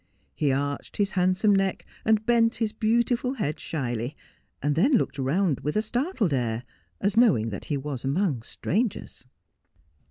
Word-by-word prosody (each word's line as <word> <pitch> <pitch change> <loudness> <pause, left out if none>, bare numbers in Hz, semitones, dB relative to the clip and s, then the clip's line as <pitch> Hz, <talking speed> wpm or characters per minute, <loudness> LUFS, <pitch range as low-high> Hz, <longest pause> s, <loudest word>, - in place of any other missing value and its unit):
He 145 -2 +1
arched 140 +1 -2
his 205 0 +1
handsome 185 +3 +3
neck, 195 -1 0 0.2
and 220 0 +2
bent 230 -1 +3
his 220 -2 -1
beautiful 235 +3 +1
head 180 - -2
shyly, 120 -2 -3 0.4
and 145 +1 0
then 215 - +3
looked 175 - +1
round 150 +3 +1
with 150 +2 -3
a 215 - +2
startled 240 - 0
air, 120 -2 -1 0.4
as 200 +1 0
knowing 205 - +4
that 100 - -6
he 145 - -1
was 135 -2 -5
amongst 140 - -1
strangers. 210 - -2
185 Hz, 155 wpm, -26 LUFS, 140-220 Hz, 0.4 s, knowing